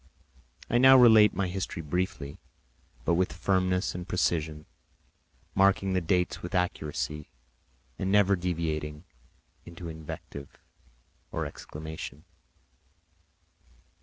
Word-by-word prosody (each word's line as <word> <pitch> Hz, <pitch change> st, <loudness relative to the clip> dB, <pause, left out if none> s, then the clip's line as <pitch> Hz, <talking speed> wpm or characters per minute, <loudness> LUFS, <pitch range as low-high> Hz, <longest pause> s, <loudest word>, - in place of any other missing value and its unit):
I 120 Hz, -, +2 dB
now 130 Hz, +1 st, +8 dB
related 110 Hz, -6 st, +7 dB
my 100 Hz, -1 st, +1 dB
history 90 Hz, -2 st, -4 dB
briefly 90 Hz, -2 st, -3 dB, 0.7 s
but -, -, +3 dB
with 90 Hz, -2 st, +1 dB
firmness 90 Hz, +3 st, 0 dB
and 90 Hz, 0 st, -6 dB
precision, 80 Hz, -4 st, -1 dB, 0.9 s
marking 95 Hz, 0 st, +3 dB
the 90 Hz, -, +1 dB
dates 90 Hz, +1 st, 0 dB
with 90 Hz, +3 st, -5 dB
accuracy 75 Hz, -4 st, -2 dB, 0.7 s
and 95 Hz, -, -1 dB
never 100 Hz, -1 st, +5 dB
deviating 80 Hz, -4 st, -3 dB, 0.6 s
into 85 Hz, 0 st, -8 dB
invective 75 Hz, -3 st, -9 dB, 0.7 s
or 80 Hz, -, -2 dB
exclamation. 75 Hz, 0 st, -8 dB
90 Hz, 100 wpm, -28 LUFS, 80-95 Hz, 0.9 s, now